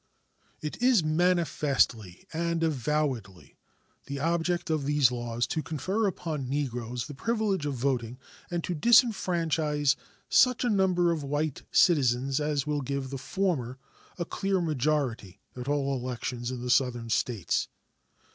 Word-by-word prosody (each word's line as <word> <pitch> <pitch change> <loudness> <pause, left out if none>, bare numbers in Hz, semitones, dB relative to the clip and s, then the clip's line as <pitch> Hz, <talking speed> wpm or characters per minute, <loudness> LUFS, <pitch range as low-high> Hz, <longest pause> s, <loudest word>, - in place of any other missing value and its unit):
It 150 +8 -5
is 245 -7 +4
manifestly 155 - +1
and 170 0 -1
avowedly 130 - -2 0.5
the 140 0 -4
object 170 +2 0
of 150 -3 0
these 145 -4 +4
laws 120 -1 -2
to 155 - -2
confer 185 +9 -1
upon 155 -8 -3
Negroes 125 -4 -2
the 145 - -8
privilege 210 - -1
of 140 - -2
voting 125 -2 -1 0.3
and 175 -1 -2
to 180 - -2
disfranchise 165 - +3 0.3
such 250 -1 +4
a 245 - +2
number 185 -3 +3
of 165 -2 -1
white 145 +1 -2
citizens 135 -4 +3
as 150 -2 0
will 150 -1 -1
give 135 0 -3
the 135 - -4
former 140 -8 -1 0.4
a 175 - -2
clear 195 +2 -1
majority 135 - -1 0.2
at 125 0 -7
all 140 -1 0
elections 125 -1 -4
in 125 -1 -5
the 125 - -1
Southern 120 -3 +1
States. 110 -6 0
145 Hz, 135 wpm, -28 LUFS, 125-170 Hz, 0.5 s, is